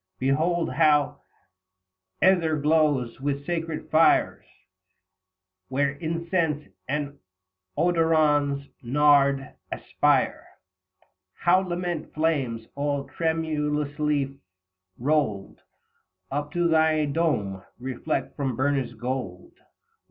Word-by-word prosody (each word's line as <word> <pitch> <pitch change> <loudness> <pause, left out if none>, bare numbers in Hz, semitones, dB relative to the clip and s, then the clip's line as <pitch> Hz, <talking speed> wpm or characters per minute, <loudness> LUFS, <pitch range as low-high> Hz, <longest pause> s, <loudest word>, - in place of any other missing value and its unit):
Behold 160 +6 +1
how 150 -3 +3 1.0
iEther 165 -5 +3
glows 145 -6 +2
with 140 0 -2
sacred 165 -1 -4
fire, 160 +1 +4 1.2
Where 140 +4 +1
incense 165 0 -2 0.2
and 145 0 -3 0.6
odorous 155 -4 +2 0.2
nard 140 +1 +3 0.2
aspire; - - +1 0.9
How 180 +2 +3
lambent 175 -3 -4
flames 140 -8 0
all 140 0 -1
tremulously 150 -3 -1 0.6
foiled 125 -8 -1 0.7
Up 145 +1 -3
to 175 0 +2
thy 160 -1 +3
dome, 140 - -1 0.2
reflect 130 +4 -3
from 135 -4 -2
burnished 130 -3 -1
gold. 120 -7 -5
150 Hz, 80 wpm, -25 LUFS, 135-160 Hz, 1.2 s, fire